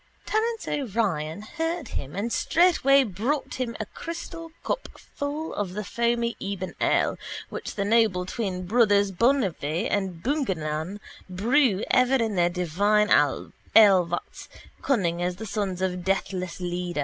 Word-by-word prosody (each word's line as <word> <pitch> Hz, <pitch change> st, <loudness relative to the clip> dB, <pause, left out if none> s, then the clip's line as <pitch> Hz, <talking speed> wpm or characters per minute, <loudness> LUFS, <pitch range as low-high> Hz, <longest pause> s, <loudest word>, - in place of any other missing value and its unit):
Terence 455 Hz, +1 st, -1 dB
O'Ryan 200 Hz, -, -1 dB
heard 325 Hz, +4 st, -3 dB
him 140 Hz, +4 st, -5 dB
and 220 Hz, +4 st, -2 dB
straightway 295 Hz, -6 st, +4 dB
brought 245 Hz, -, -2 dB
him 235 Hz, -3 st, -2 dB
a 215 Hz, -, -2 dB
crystal 330 Hz, +4 st, -7 dB
cup -, -, -2 dB
full 295 Hz, +3 st, -5 dB
of 190 Hz, -3 st, -3 dB
the 210 Hz, -, -3 dB
foamy 235 Hz, +2 st, 0 dB
ebon 195 Hz, -2 st, -4 dB
ale -, -, +2 dB, 0.3 s
which -, -, -6 dB
the 200 Hz, -, -1 dB
noble 215 Hz, -4 st, +3 dB
twin 185 Hz, -3 st, -3 dB
brothers 205 Hz, -1 st, +3 dB
Bungiveagh 195 Hz, -, +1 dB
and 190 Hz, -5 st, -2 dB
Bungardilaun 190 Hz, -, -2 dB, 0.3 s
brew 220 Hz, +2 st, +2 dB
ever 255 Hz, +1 st, +4 dB
in 225 Hz, -4 st, +1 dB
their 175 Hz, -2 st, +3 dB
divine 200 Hz, +5 st, +1 dB
alevats, 175 Hz, +4 st, +3 dB, 0.3 s
cunning 175 Hz, -10 st, 0 dB
as 180 Hz, 0 st, -1 dB
the 220 Hz, -, -7 dB
sons 195 Hz, -3 st, -2 dB
of 180 Hz, -1 st, -2 dB
deathless 185 Hz, -1 st, -2 dB
Leda. 175 Hz, -2 st, -3 dB
205 Hz, 135 wpm, -26 LUFS, 180-250 Hz, 0.3 s, straightway